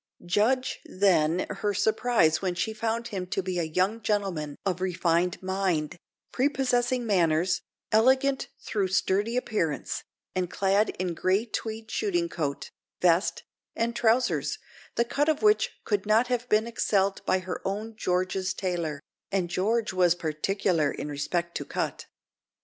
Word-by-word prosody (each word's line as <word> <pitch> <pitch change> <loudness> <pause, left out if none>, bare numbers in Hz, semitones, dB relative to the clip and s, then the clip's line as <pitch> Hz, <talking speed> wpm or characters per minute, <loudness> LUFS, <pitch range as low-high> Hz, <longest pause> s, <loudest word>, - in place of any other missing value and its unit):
Judge, 230 +9 +1
then, 180 -3 +2
her 205 -2 -2
surprise 210 -5 +2
when 185 -2 -1
she 220 +5 -1
found 230 +1 -2
him 185 -3 -4
to 190 - -2
be 185 -1 -2
a 160 -2 -3
young 200 +5 +1
gentleman 190 -9 -1
of 185 -2 -1
refined 180 -1 +1
mind, 185 -5 0 0.4
prepossessing 255 -2 +1
manners, 175 -3 +2 0.3
elegant 260 +5 +3 0.3
though 200 -3 +2
sturdy 200 +4 +1
appearance, 170 - -1 0.3
and 185 -2 -1
clad 200 +3 +2
in 180 -1 -1
grey 190 +6 +1
tweed 220 -1 -5
shooting 350 -5 0
coat, 145 - -3 0.3
vest, 175 +2 +2 0.3
and 235 +1 -1
trousers, 240 +1 +2 0.4
the 235 - +2
cut 290 +5 +1
of 310 +4 0
which 430 +3 +4
could 205 -1 -1
not 225 +4 +4
have 245 -1 -1
been 215 +1 +3
excelled 200 -4 0
by 185 - +4
her 185 0 -5
own 215 +3 -3
George's 185 -1 -1
tailor, 170 -6 -2 0.3
and 185 -3 0
George 215 +4 0
was 180 -2 +4
particular 165 0 0
in - - -5
respect 170 +4 -2
to - - -2
cut. - - -3
195 Hz, 145 wpm, -27 LUFS, 175-230 Hz, 0.4 s, which